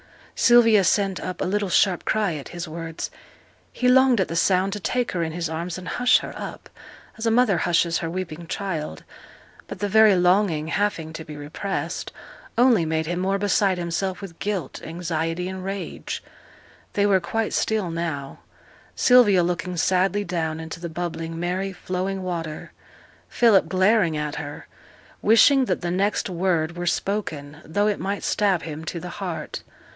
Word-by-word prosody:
Sylvia 230 -4 +5
sent 195 0 +1
up 185 - -5
a - - -1
little 200 +1 0
sharp 185 0 +2
cry 210 -5 +1
at 145 -3 -6
his 175 0 -6
words. 165 0 -6 0.6
He 250 - -1
longed 260 -2 +5
at 190 - +2
the 165 - -4
sound 190 +2 +2
to 210 - -4
take 245 +6 -1
her 180 - -2
in 160 -1 -1
his 170 0 -2
arms 165 +2 -4
and 180 -1 -8
hush 250 +5 +4
her - - -6
up, - - -7 0.5
as 225 - -1
a - - +3
mother 225 -6 +3
hushes 170 -1 +2
her 165 - -3
weeping 170 -2 -5
child. 165 - -4 0.6
But - - -7
the 205 - -1
very 215 0 +6
longing, 180 -3 +2
having 165 -5 -1
to 165 - -6
be 150 -1 -9
repressed, 160 +2 -4 0.5
only 240 -7 +5
made 160 0 -1
him 175 +2 -2
more 195 +2 +1
beside 200 -1 +2
himself 175 +2 -2
with 185 -5 -10
guilt, 195 -9 -3
anxiety, 165 +1 -3
and 190 0 -6
rage. 195 +1 -5 0.7
They 205 - +2
were 195 -2 +4
quite 220 +5 -2
still 210 -6 0
now. 160 -5 -4 0.6
Sylvia 215 -8 +5
looking 180 +1 -2
sadly 190 +4 +2
down 160 -3 -2
into 160 +1 -7
the 170 0 -5
bubbling, 165 0 -4
merry, 185 +3 -2
flowing 185 +1 -3
water: 165 -4 -5 0.6
Philip 210 -8 +4
glaring 185 -3 +3
at 150 -1 -3
her, 145 -1 -7 0.5
wishing 260 +5 +5
that 185 -6 -1
the 175 -1 -2
next 195 +3 0
word 170 -3 0
were 175 0 -4
spoken, 155 -7 -2
though 205 +6 0
it 210 - 0
might 200 +1 -3
stab 195 -5 +1
him 155 -1 -6
to 170 - -4
the 180 - -7
heart. 180 -4 -4
180 Hz, 170 wpm, -24 LUFS, 165-200 Hz, 0.7 s, very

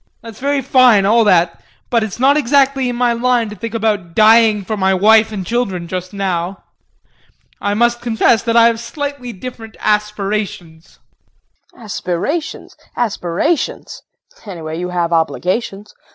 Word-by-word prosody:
That's 225 -2 -11
all 280 - -1
very 285 -1 0
fine 240 -6 +4
all 225 +3 +4
that, 175 -4 +2 0.3
but 235 -2 +2
it's 215 -4 -5
not 275 +3 +4
exactly 275 -2 +2
in 245 - -3
my 240 0 +1
line 240 -1 0
to - - -8
think 230 +3 -6
about 205 -7 -2
dying 220 -1 +5
for 215 - -3
my 190 -1 +1
wife 220 +3 +4
and 195 -4 -5
children 195 -6 -2
just 185 +1 -5
now. 190 -2 -3 1.0
I 205 0 -1
must 240 +2 +1
confess 230 -2 +2
that 230 0 0
I 230 - +7
have 230 -1 +2
slightly 280 0 -6
different 225 +1 -10
aspirations. 210 -5 -3 0.7
KRISTIN. - - -17
Aspirations? 210 - -4 0.2
Aspirations 225 - -2 0.5
anyway 165 -4 -6
you 180 0 -4
have 175 -1 -1
obligations. 190 +5 -2
215 Hz, 150 wpm, -16 LUFS, 190-240 Hz, 1.0 s, I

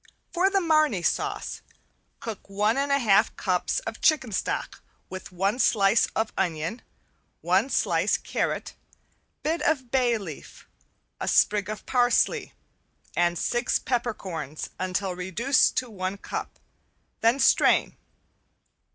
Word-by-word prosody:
For 370 +2 +3
the 395 0 +2
Marnay 310 - +2
sauce, - - -2 0.6
cook 220 -4 -7
one 210 +3 +1
and 280 +1 0
one 280 0 +3
half 205 -4 +3
cups 180 -2 -1
of 225 0 -7
chicken 280 -7 +3
stock 185 - -3 0.3
with 185 -1 -8
one 195 +6 -1
slice 205 -2 +4
of 220 0 -1
onion, 170 +4 -2 0.6
one 185 +9 +2
slice - - +1
carrot, - - -3 0.7
bit 325 +2 -1
of 260 -6 0
bay 245 -3 +2
leaf, 170 -9 -10 0.5
a - - -4
sprig 205 -1 +3
of 215 0 -6
parsley 245 -2 +2 0.6
and 175 0 +2
six 240 +8 0
peppercorns 190 - -4
until 185 0 -2
reduced 200 +10 +1
to 255 - -1
one 190 -1 -4
cup, - - -6 0.6
then 230 +4 +3
strain. - - +4
215 Hz, 125 wpm, -26 LUFS, 185-255 Hz, 0.7 s, slice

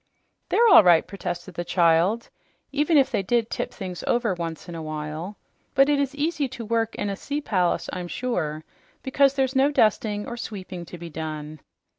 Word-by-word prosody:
"They're 470 - +4
all 390 - +9
right," 175 -3 +5
protested 175 -2 -6
the 175 - -3
child, 175 +6 +2 0.4
"even 295 +3 +2
if 270 -1 +4
they 215 -5 +1
did 230 +3 0
tip - - -3
things 185 -4 -7
over 235 -4 +1
once 170 -2 -5
in 175 - -7
a 165 - -5
while. 155 +5 -5 0.4
But 275 +2 +5
it 290 -1 +3
is 280 0 -1
easy 295 -1 0
to 245 -2 -8
work 225 0 0
in - - -2
a 200 - -2
sea 285 +8 -4
palace, 180 - 0
I'm 180 -1 -4
sure, 165 -10 -3 0.4
because 275 +1 +3
there's 265 -1 0
no 270 +2 +4
dusting 215 -5 +1
or 240 - -6
sweeping 185 -6 -7
to 175 - -10
be 170 0 -9
done." 155 -1 -6
205 Hz, 190 wpm, -24 LUFS, 170-260 Hz, 0.4 s, all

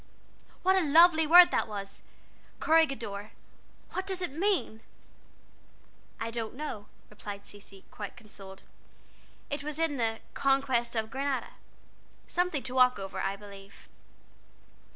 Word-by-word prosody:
What 380 +1 +4
a 380 - +3
lovely 320 +1 +6
word 350 +2 +9
that - - +1
was. 200 -2 -7 0.6
'Corregidor' 240 -11 +1 0.6
what 375 +1 -4
does 380 -1 -3
it 360 -6 -3
mean?" 340 - 0 1.4
"I 230 0 -3
don't 230 0 -4
know," 255 -8 -6 0.2
replied 205 -1 -8
Cecy, 200 -1 -13
quite 205 +2 -8
consoled. 195 -4 -12 0.9
"It 285 0 -2
was 300 0 -5
in 325 -3 0
the 225 -2 0 0.2
'Conquest 260 -4 +1
of 220 0 -2
Granada.' 275 +1 -2 0.7
Something 355 -6 -1
to 255 - -5
walk 255 -1 +5
over, 195 -1 -6
I 195 +1 -1
believe." 200 -1 -13
250 Hz, 125 wpm, -29 LUFS, 205-315 Hz, 1.4 s, word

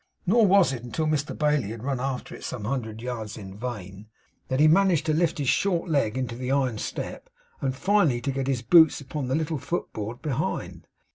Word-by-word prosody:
Nor 215 +3 +5
was 195 -6 +5
it 125 - -5
until 125 +6 -2
Mr 155 -1 -1
Bailey 150 -7 +1
had 115 +1 -7
run 135 -1 -1
after 130 -1 -3
it - - -10
some 120 -5 -5
hundreds 110 -2 -3
of 115 - -10
yards 115 -4 -5
in 95 -3 -9
vain, 105 -3 -7 0.4
that 130 0 -1
he 155 - +6
managed 180 0 +4
to 155 - +1
lift 165 +1 +1
his 140 -3 -2
short 180 +4 +1
leg 130 -6 +1
into 125 -3 -3
the 125 +1 -4
iron 130 -5 +1
step, - - -5 0.3
and 130 -1 -1
finally 180 -6 +2
to 135 +2 -1
get 135 0 -2
his 130 -3 -1
boots 160 +2 +6
upon 140 -1 -5
the 130 - 0
little 160 -1 -1
footboard 120 -7 -4
behind. 145 -6 -3
135 Hz, 210 wpm, -26 LUFS, 120-155 Hz, 0.4 s, he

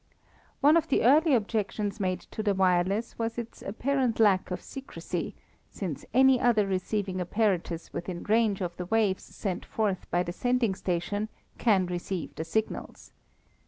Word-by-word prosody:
One 295 +3 +6
of 330 - +1
the 275 - +2
early 295 +4 +6
objections 210 -1 -1
made 185 -2 -1
to - - -3
the 205 -2 +1
wireless 190 +5 +1
was 230 0 -2
its 235 -1 -6
apparent 250 +3 0
lack 200 -4 +4
of 180 - -3
secrecy, 270 -1 -6 0.3
since 175 -8 -5
any 265 +1 +5
other 230 -4 +3
receiving 190 0 -1
apparatus 180 -3 -1
within 175 0 -5
range 215 -2 +2
of 175 -2 -3
the 180 - -5
waves 210 -2 +2
sent 190 -4 -4
forth 205 -4 -2
by 175 +1 +1
the 175 - -5
sending 245 0 +1
station 190 +4 -2 0.3
can 200 -6 +3
receive 175 0 -4
the 160 - -4
signals. 220 +7 -3
205 Hz, 155 wpm, -28 LUFS, 185-230 Hz, 0.3 s, One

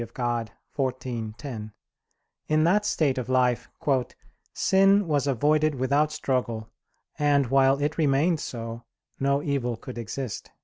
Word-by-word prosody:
Dei 120 - -4 0.8
xiv, 120 -4 -5
10), 115 -6 -7 0.7
in 155 0 +3
that 205 +5 +3
state 140 -9 +1
of 125 - -5
life 125 -2 +2 0.8
"sin 195 0 +3
was 145 -3 +1
avoided 150 +3 +2
without 140 +4 +1
struggle, 125 -6 -2 0.5
and 145 -2 +3
while 135 0 +4
it 150 +3 -1
remained 155 +3 +2
so, 115 -2 -6 0.4
no 140 +1 +1
evil 125 -5 -1
could 120 +1 -8
exist." 115 +1 -5
135 Hz, 125 wpm, -26 LUFS, 120-150 Hz, 0.8 s, while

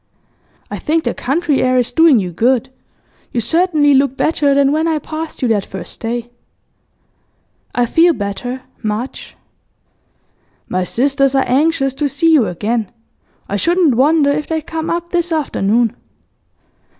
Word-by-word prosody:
I - - -4
think 320 +1 0
the - - -1
country 290 +2 0
air 255 0 +2
is 245 -2 0
doing 325 -5 +5
you 185 -4 -2
good; 250 +7 +1 0.6
you 240 - -1
certainly 305 - +2
look 270 -1 +2
better 290 -3 +1
than 280 0 +3
when 315 +2 +1
I 320 -1 +1
passed 310 0 -6
you - - +3
that 210 -3 +1
first 185 -3 -8
day.' 235 +1 -4 1.4
'I 245 - +2
feel 335 +7 +4
better, 245 +4 -5 0.2
much.' 220 +3 -5 1.3
'My 185 0 -1
sisters 275 - +1
are 270 - +2
anxious 275 0 +1
to 290 +1 -1
see 330 +4 +2
you 260 -9 +4
again. 210 +4 -2 0.6
I 200 - -2
shouldn't 340 - +2
wonder 285 +4 +3
if 295 +1 -2
they 320 -1 -2
come 320 +1 -4
up 345 0 -3
this 350 -1 0
afternoon. 235 -7 0
275 Hz, 150 wpm, -16 LUFS, 235-320 Hz, 1.4 s, doing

